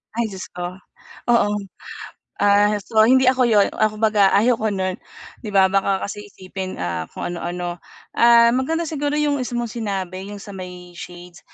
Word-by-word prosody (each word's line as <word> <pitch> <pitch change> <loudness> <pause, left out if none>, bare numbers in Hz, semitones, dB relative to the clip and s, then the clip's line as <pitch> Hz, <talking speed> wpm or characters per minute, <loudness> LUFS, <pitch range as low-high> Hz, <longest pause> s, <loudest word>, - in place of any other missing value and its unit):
Ay 235 0 0
Diyos 190 -1 -7
ko, 180 +1 -5 0.5
oo, 235 -3 +3 0.9
ah, 205 +1 +4
so 220 +2 +1
hindi 260 +1 +5
ako 255 -1 +2
'yon, 205 -3 +4
ah, 215 - +4
kumbaga 215 -2 +3
ayoko 220 +1 +2
no'n 185 -1 -2 0.4
'di 215 - -6
ba 190 -1 +5
baka 195 0 +1
kasi 205 +1 -7
isipin, 185 0 -7
ah, 85 -2 -3
kung - - -4
ano-ano. 175 0 -4 0.3
Ah, 235 0 +6
maganda 320 +7 0
siguro 295 -2 -2
'yong 290 -2 +1
isa 250 -1 -4
mong 235 -2 -3
sinabi, 195 -4 -4
'yong 205 -1 -8
sa 205 - -10
may 180 -1 -9
shades, 175 0 -11
205 Hz, 165 wpm, -21 LUFS, 185-235 Hz, 0.9 s, Ah